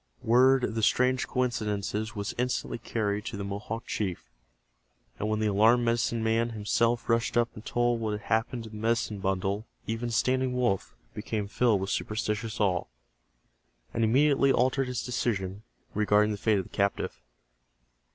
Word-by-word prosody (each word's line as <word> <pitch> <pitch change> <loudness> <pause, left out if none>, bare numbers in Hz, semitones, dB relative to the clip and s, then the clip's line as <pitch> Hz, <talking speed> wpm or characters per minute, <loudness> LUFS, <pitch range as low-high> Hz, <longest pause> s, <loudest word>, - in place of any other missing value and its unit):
Word 130 +3 +5
of 110 - -1
the 110 - -1
strange 125 +3 +2
coincidences 110 -3 -2
was 100 -1 -3
instantly 125 -1 -1
carried 105 -3 -2
to 115 -4 -5
the 100 - -4
Mohawk 105 +4 -5
chief, 95 -5 -3 0.9
and 105 - -1
when 110 0 0
the 110 - 0
alarmed 110 +4 +4
medicine 115 0 +1
man 115 +1 +1
himself 115 +2 0
rushed 115 0 +1
up 120 0 +3
and 105 - -10
told 120 0 0
what 110 -1 -1
had 105 - -4
happened 115 +2 -1
to 110 - -10
the - - -10
medicine 110 -1 0
bundle 95 +2 -1 0.2
even 115 +2 -3
Standing 130 +2 +1
Wolf 120 -6 0 0.2
became 105 -1 -3
filled 110 -2 +2
with 95 - -2
superstitious 105 0 -2
awe, 95 -4 +1 1.1
and 115 - 0
immediately 140 +4 +4
altered 130 +1 +2
his 125 -1 -3
decision 105 -6 -2 0.3
regarding 105 0 +3
the 105 - -3
fate 110 +1 +2
of 95 - -1
the - - -14
captive. 100 -10 -1
110 Hz, 160 wpm, -28 LUFS, 105-120 Hz, 1.1 s, Word